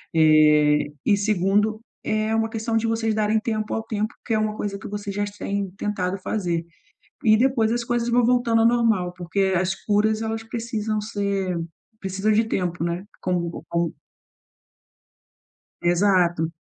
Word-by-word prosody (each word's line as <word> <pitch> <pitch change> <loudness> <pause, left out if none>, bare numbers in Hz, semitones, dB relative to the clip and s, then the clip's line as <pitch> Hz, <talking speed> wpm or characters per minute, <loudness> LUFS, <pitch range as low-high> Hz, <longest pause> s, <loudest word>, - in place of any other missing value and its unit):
Eh, 150 -2 +5
e 205 - +4
segundo, 210 +1 +1 0.2
é 215 0 0
uma 225 0 +1
questão 225 0 -1
de 225 - 0
vocês 225 -1 0
darem 215 0 +2
tempo 215 -1 -2
ao 225 - -1
tempo, 215 0 -3
que 225 - -1
é 220 - +3
uma 215 0 -1
coisa 205 -2 -3
que - - -8
vocês 205 0 -5
já 205 0 0
têm 200 -1 -4
tentado 195 -3 -2
fazer 175 -4 -2 0.6
e 215 -1 +6
depois 240 -2 +2
as 240 0 -1
coisas 240 0 -1
vão 240 0 +3
voltando 240 -2 +3
ao 225 - +5
normal, 225 -7 +2
porque 175 +2 -3 0.2
as 185 +2 +1
curas, 215 +1 +2
elas 225 0 -3
precisam 225 -2 -3
ser, 200 -3 -2 0.4
precisam 195 +3 0
de 220 +2 +3
tempo, 180 -6 -2
né. 170 +2 -2 0.2
Como 175 -2 -2
como. 170 -1 0 1.9
Exato. 175 -2 +2
210 Hz, 155 wpm, -23 LUFS, 180-225 Hz, 1.9 s, e